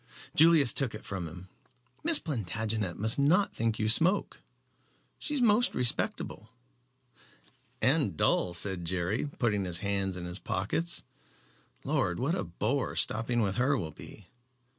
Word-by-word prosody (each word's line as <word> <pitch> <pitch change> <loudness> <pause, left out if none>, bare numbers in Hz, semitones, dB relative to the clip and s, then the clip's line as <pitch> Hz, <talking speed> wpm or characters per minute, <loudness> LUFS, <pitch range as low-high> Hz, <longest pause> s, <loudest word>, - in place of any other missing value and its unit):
Julius 155 -6 +5
took 130 -6 -1
it 110 - -10
from 95 -4 -4
him. 90 +3 -11 0.6
"Miss 330 -1 +7
Plantagenet 110 - -3
must 110 +5 +1
not 175 +8 +2
think 115 -1 -1
you 110 - -1
smoke, 165 - +4
Jerry. - - -39
She 300 - -4
is 260 - +1
most 230 +2 +3
respectable." 115 -3 -1 1.3
"And - - +1
dull," 90 -1 +1
said 95 0 0
Jerry, 95 - -2
putting 105 -5 0
his 90 -2 -1
hands 100 -2 -1
in 90 - -6
his 90 +2 -5
pockets. 160 - -2 0.8
"Lord! 130 - -1
what 140 +6 0
a - - -2
bore 105 +10 -2
stopping 115 +2 +1
with 100 -3 -1
her 130 +3 +2
will 80 -8 -4
be. 100 +6 -12
110 Hz, 145 wpm, -29 LUFS, 95-140 Hz, 1.3 s, Miss